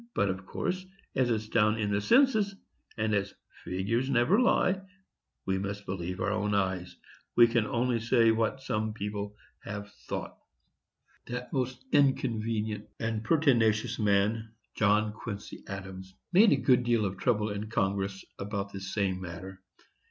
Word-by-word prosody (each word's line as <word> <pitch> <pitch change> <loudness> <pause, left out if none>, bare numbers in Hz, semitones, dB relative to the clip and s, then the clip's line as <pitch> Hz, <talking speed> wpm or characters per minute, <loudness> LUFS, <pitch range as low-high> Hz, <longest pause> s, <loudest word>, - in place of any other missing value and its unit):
But, 100 - +2
of 95 0 -4
course, 185 +1 -2 0.3
as 130 -2 +2
it's 110 -2 -1
down 110 0 +3
in 105 -2 -1
the 100 0 +1
census, 220 - +4 0.4
and 110 -1 0
as 100 -1 -1 0.3
"figures 110 +8 -1
never 140 - +4
lie," 195 -6 +3 0.6
we 95 0 0
must 100 +1 -4
believe 90 -1 -4
our 100 - 0
own 105 -1 0
eyes. 95 -2 -1 0.4
We 120 - +9
can 115 -2 +1
only 120 +1 +1
say 115 0 +4
what 115 +4 0
some 110 -4 -1
people 105 -1 -4 0.3
have 100 0 -6
thought. - - -4 0.9
That 125 0 -5
most 130 -1 -2
inconvenient 115 -6 +1
and 110 -1 -2
pertinacious 115 -8 +2
man, 110 +2 +1 0.2
John 105 0 +2
Quincy 105 -1 -7
Adams, 95 -1 -7 0.2
made 205 +4 +7
a - - +6
good 130 -2 +3
deal 120 -3 +2
of 95 -1 -3
trouble 105 -3 +1
in 105 +1 -4
Congress 95 -2 -1
about 100 0 -4
this 95 -1 -6
same 95 -3 0
matter. 95 +2 -8
110 Hz, 150 wpm, -29 LUFS, 100-120 Hz, 0.9 s, We